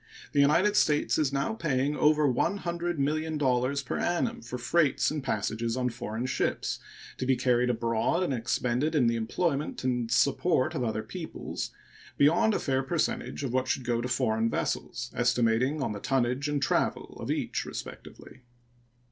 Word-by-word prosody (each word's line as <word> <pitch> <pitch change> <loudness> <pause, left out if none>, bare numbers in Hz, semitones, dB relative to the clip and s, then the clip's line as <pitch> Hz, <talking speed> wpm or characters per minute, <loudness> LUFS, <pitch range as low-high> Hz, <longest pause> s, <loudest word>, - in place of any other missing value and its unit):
The 145 - +1
United 170 +9 +4
States 150 -6 +2
is 145 -3 +2
now 140 +10 -1
paying 145 -7 0
over 150 0 +4
$100,000,000 150 -5 0
per - - -2
annum 230 +7 0
for 125 - -6
freights 145 +6 +2
and 150 -2 -3
passage 115 0 -1
on 125 -1 +1
foreign 115 0 -4
ships 130 0 -1 0.4
to 130 - -1
be 135 - +4
carried 125 0 +2
abroad 115 +8 +1
and 160 - 0
expended 125 +5 0
in 135 -5 +4
the 115 0 +2
employment 140 +7 -1
and 120 -2 0
support 130 +5 +2
of 135 -6 -2
other 110 -2 -2
peoples - - -5 0.5
beyond 170 +9 +4
a - - +1
fair 135 -1 0
percentage 155 0 -2
of 130 -3 -3
what 130 0 +1
should 130 - -1
go 120 -1 0
to 125 - -2
foreign 115 -2 +1
vessels, 125 +1 -3
estimating 125 +4 +2
on - - -1
the 105 - -5
tonnage 130 +3 0
and 145 -2 0
travel - - 0
of - - -6
each - - -1
respectively. - - -9
130 Hz, 160 wpm, -28 LUFS, 120-150 Hz, 0.5 s, United